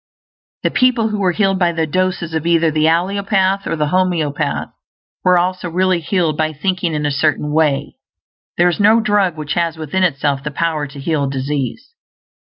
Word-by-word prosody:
The - - +1
people 245 -3 +2
who 210 -1 -3
were 185 -2 +2
healed 195 0 +1
by 175 -2 +2
the 165 -1 0
doses 180 0 -1
of 160 +1 -2
either 165 -1 +3
the 155 0 +1
allopath 195 +3 +1
or - - -1
the 150 -2 -1
homeopath 155 -5 0 0.5
were 180 -1 +4
also 180 0 -1
really 185 +1 +1
healed 170 -3 0
by 155 0 -1
thinking 180 +1 -1
in 150 0 -2
a 145 - 0
certain 150 +1 0
way; 150 -3 0 0.6
there 175 - +4
is 175 - 0
no 215 +3 +5
drug 205 -6 +1
which 150 -1 -3
has 170 -2 -1
within 160 +4 -2
itself 140 -5 +1
the 150 - -3
power 155 0 -2
to 140 +1 -11
heal 145 -1 -1
disease. 140 - -4
170 Hz, 180 wpm, -17 LUFS, 150-185 Hz, 0.6 s, no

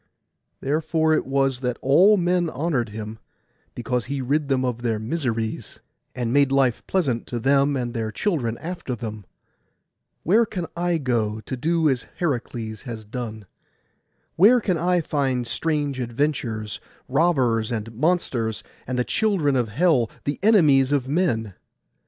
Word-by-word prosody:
Therefore 160 +2 +1
it 155 - 0
was 135 -1 +1
that 125 -2 -2
all 185 +10 +5
men 175 -1 +1
honoured 140 -5 -1
him, 110 +1 -7 0.6
because 120 0 -2
he 140 +1 -3
rid 140 +3 0
them 130 -2 +1
of 120 -2 -2
their 115 -3 0
miseries, 115 -2 -3 0.4
and 120 -2 -2
made 140 -1 +4
life 135 -3 +2
pleasant 140 -12 0
to 120 - -3
them 140 +3 +3
and 120 -2 -3
their 110 -3 -2
children 125 - -1
after 170 -7 -5
them. 110 -3 -7 1.0
Where 215 +8 +4
can 180 -5 -4
I 175 0 0
go, 115 -6 -1
to 130 - -5
do 160 +5 +1
as 130 -4 0
Heracles 120 -8 -3
has 115 -4 -7
done? 110 -1 -6 0.9
Where 220 +8 +7
can 185 -7 -1
I 180 +1 +2
find 135 -5 -1
strange 145 +1 -1
adventures, 120 -4 -2 0.3
robbers, 130 -7 +2
and 115 0 -4
monsters, 120 - 0 0.2
and 130 0 -2
the 125 - +2
children 180 - +1
of 120 -3 +1
hell, 130 - +2
the 145 - -2
enemies 150 -11 +5
of 140 -3 +1
men? 135 - 0
135 Hz, 145 wpm, -23 LUFS, 115-160 Hz, 1.0 s, Where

